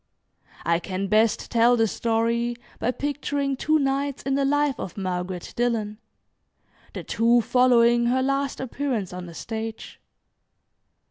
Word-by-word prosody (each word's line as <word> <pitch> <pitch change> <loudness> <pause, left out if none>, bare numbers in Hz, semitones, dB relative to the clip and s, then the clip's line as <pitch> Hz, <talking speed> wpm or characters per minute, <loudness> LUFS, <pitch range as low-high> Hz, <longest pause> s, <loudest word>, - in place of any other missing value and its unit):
I 170 0 +2
can 185 +2 -4
best 215 +2 +2
tell 240 +1 +4
the 225 - +3
story 230 +2 0 0.2
by - - 0
picturing 285 0 -2
two 310 +4 +2
nights 275 -1 -1
in 270 - -1
the 275 0 +1
life 290 0 +1
of 185 - -6
Margaret 180 -1 -4
Dillon, 225 -3 -1 0.9
the - - -6
two 235 +1 +3
following 240 -1 +4
her 260 +2 +2
last 275 +1 -1
appearance 255 -7 -3
on 180 0 -7
the 170 - -11
stage. 225 +2 -6
235 Hz, 135 wpm, -24 LUFS, 215-270 Hz, 0.9 s, tell